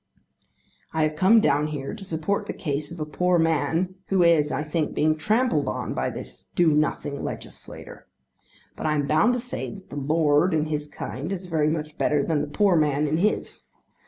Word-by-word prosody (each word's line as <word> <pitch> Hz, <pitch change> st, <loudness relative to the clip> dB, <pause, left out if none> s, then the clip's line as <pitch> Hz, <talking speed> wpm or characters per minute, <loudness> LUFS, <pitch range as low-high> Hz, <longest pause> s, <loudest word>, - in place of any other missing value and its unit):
I 160 Hz, -1 st, +1 dB
have 155 Hz, 0 st, 0 dB
come 195 Hz, +8 st, +5 dB
down 150 Hz, -7 st, +2 dB
here 145 Hz, 0 st, -5 dB
to 215 Hz, -2 st, -8 dB
support 185 Hz, +2 st, -2 dB
the -, -, -3 dB
case 150 Hz, -3 st, -3 dB
of 170 Hz, -, -8 dB
a 155 Hz, -, -2 dB
poor 180 Hz, +4 st, +1 dB
man 165 Hz, +2 st, +1 dB
who 190 Hz, -2 st, +3 dB
is 160 Hz, -3 st, +4 dB
I 140 Hz, +3 st, -1 dB
think 155 Hz, 0 st, -2 dB
being 155 Hz, +1 st, +2 dB
trampled 210 Hz, -, +1 dB
on -, -, -3 dB
by -, -, -1 dB
this -, -, -8 dB
do 175 Hz, -2 st, +4 dB
nothing 150 Hz, -1 st, 0 dB
legislator. -, -, -8 dB, 0.7 s
But -, -, -3 dB
I 155 Hz, -, +1 dB
am 145 Hz, -1 st, 0 dB
bound 160 Hz, +12 st, +3 dB
to -, -, -1 dB
say 245 Hz, -3 st, -5 dB
that 195 Hz, -2 st, -14 dB
the -, -, -7 dB
lord 150 Hz, +3 st, +2 dB
in 155 Hz, -1 st, +1 dB
his 150 Hz, -1 st, -3 dB
kind 145 Hz, +2 st, -6 dB
is 190 Hz, -1 st, -4 dB
very 160 Hz, -4 st, +1 dB
much 155 Hz, -1 st, -4 dB
better 150 Hz, -1 st, +2 dB
than 155 Hz, -3 st, 0 dB
the -, -, -3 dB
poor 190 Hz, +5 st, +2 dB
man 150 Hz, -2 st, +2 dB
in 155 Hz, +2 st, 0 dB
his. 210 Hz, +5 st, -1 dB
155 Hz, 200 wpm, -25 LUFS, 150-180 Hz, 0.7 s, come